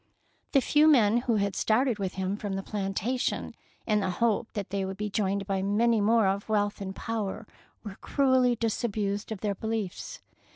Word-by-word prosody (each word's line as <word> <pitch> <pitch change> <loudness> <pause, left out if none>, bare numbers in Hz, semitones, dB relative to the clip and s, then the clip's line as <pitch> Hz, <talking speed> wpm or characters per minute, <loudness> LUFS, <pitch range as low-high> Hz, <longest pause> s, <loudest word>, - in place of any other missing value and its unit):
The 275 - +5
few 300 +4 +4
men 235 -7 +5
who 240 -1 +1
had 200 -1 0
started 235 0 +1
with 190 -2 -3
him 190 +1 -1
from 205 -1 -4
the 195 0 -3
plantation 210 +5 -2 0.3
in 210 -2 +2
the 190 -2 -1
hope 225 +3 0
that 200 -4 -5
they 200 -1 -1
would 190 0 -5
be 210 0 -3
joined 200 -1 0
by 195 -1 -1
many 215 +3 +2
more 225 +1 +4
of 195 +2 -1
wealth 205 -1 0
and 190 -1 -5
power 220 -2 -4 0.4
were 205 -1 -8
cruelly 260 -3 +3
disabused 215 -2 -2
of 215 - -5
their 205 -2 0
beliefs. 220 - -4
210 Hz, 180 wpm, -28 LUFS, 195-230 Hz, 0.4 s, The